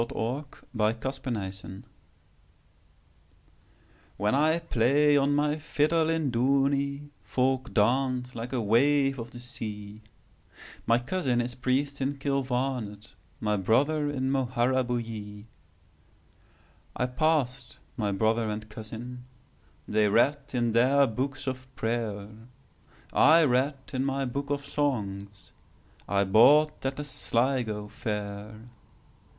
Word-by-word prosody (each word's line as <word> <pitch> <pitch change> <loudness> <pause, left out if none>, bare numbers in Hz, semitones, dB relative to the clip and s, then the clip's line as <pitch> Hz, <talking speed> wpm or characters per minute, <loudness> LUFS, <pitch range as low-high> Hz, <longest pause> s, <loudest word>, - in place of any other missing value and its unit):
The 115 - -1
Fiddler 120 -2 -3
of 130 +4 -5
Dooney 95 -5 -5 2.3
WHEN 105 +3 +1
I 155 +4 +3
play 145 -1 +3
on 140 0 +3
my 150 +1 +1
fiddle 155 +1 +1
in 160 -4 0
Dooney, 140 +3 +1
Folk 130 0 0
dance 125 +3 +1
like 120 +1 -6
a 130 - -1
wave 135 +5 +3
of 115 0 -6
the 120 - -11
sea; 105 -4 -7 0.9
My 115 +1 +5
cousin 125 -1 -1
is 120 +1 -2
priest 135 +3 -1
in 140 +2 -1
Kilvarnet, 130 -6 -2 0.3
My 105 -1 0
brother 145 +10 +2
in 130 -2 -1
Moharabuiee.I 120 -5 -1 1.6
passed 125 -2 0 0.2
my 105 -6 -1
brother 110 +3 +1
and 105 0 -5
cousin:They 115 -1 -5
read 135 +8 +3
in 120 -2 0
their 130 +5 +4
books 130 +4 -3
of 130 -1 -4
prayer;I 115 +8 0
read 135 +1 +2 0.2
in 130 0 0
my 135 0 -1
book 140 +3 -4
of 145 0 -1
songsI 100 -6 -4
bought 145 +8 +5
at 135 0 -1
the 145 - -3
Sligo 120 -6 -1
fair. 105 +1 -6
125 Hz, 105 wpm, -28 LUFS, 110-140 Hz, 2.3 s, My